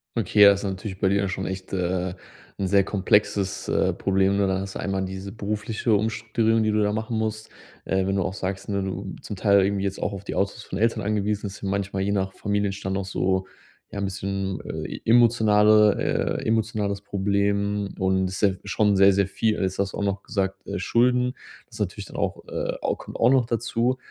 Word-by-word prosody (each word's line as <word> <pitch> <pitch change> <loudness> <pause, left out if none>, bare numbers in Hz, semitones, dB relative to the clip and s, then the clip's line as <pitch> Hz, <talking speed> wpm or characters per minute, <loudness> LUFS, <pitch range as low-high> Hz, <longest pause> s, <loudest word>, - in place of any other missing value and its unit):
Okay, 105 -1 +2
ja, 100 0 +10
ist 100 +1 -1
natürlich 95 0 -4
bei 95 - +2
dir 100 - +2
ja 100 -1 0
schon 95 0 -3
echt, 95 0 -6
äh, 90 0 -1 0.5
'n 95 - 0
sehr 100 0 +4
komplexes, 100 0 +1
äh, - - +1
Problem, 95 0 +1
ne? 100 - +2
Dann 95 0 0
hast 95 0 -6
du - - -4
einmal 95 -1 -1
diese 95 +1 -6
berufliche 105 +2 -2
Umstrukturierung, 110 +1 +1
die 110 - +2
du 105 0 +2
da 105 - +2
machen 110 +2 -2
musst, 110 0 -3 0.4
äh, 95 0 0
wenn 95 - 0
du 95 - +1
auch 95 - -3
sagst, 95 0 -4
ne, 100 -1 0
du 95 0 -4
zum 105 - -6
Teil 100 0 +4
irgendwie 100 0 0
jetzt 95 -1 -3
auch 100 - -1
auf 100 -1 -7
die - - -5
Autos 100 0 -1
von 95 - -5
Eltern 115 -1 +1
angewiesen 105 0 -1
ist, 95 - -9
und 100 - -3
manchmal, 100 0 -2
je 100 +1 0
nach 95 -1 -1
Familienstand, 100 -1 -2
auch 100 - -3
so, 95 -1 0 0.5
ja, 100 - -5
'n - - -2
bisschen, 95 0 -3
äh, - - -5
e - - -14
emotionale 110 -3 +4
äh, - - -8
emotionales 110 -3 0
Problem 100 0 0
und 95 0 +1
ist, 95 - -5
ja, 100 - +5 0.2
schon 100 0 +2
sehr, 100 0 +6
sehr 100 0 +2
viel. 110 +1 0
Jetzt 95 0 -2
hast 100 -1 0
du - - -5
auch - - -2
noch 100 0 -1
gesagt: 95 -1 -3
„Äh, - - -3
Schulden“ 125 +1 +2 0.4
ist - - -12
natürlich - - -3
dann - - -10
auch - - -2
äh, - - -2
au - - -1
kommt - - -10
auch 115 - +4
noch 130 -2 +4
dazu. 120 +2 0
100 Hz, 220 wpm, -24 LUFS, 95-105 Hz, 0.5 s, ja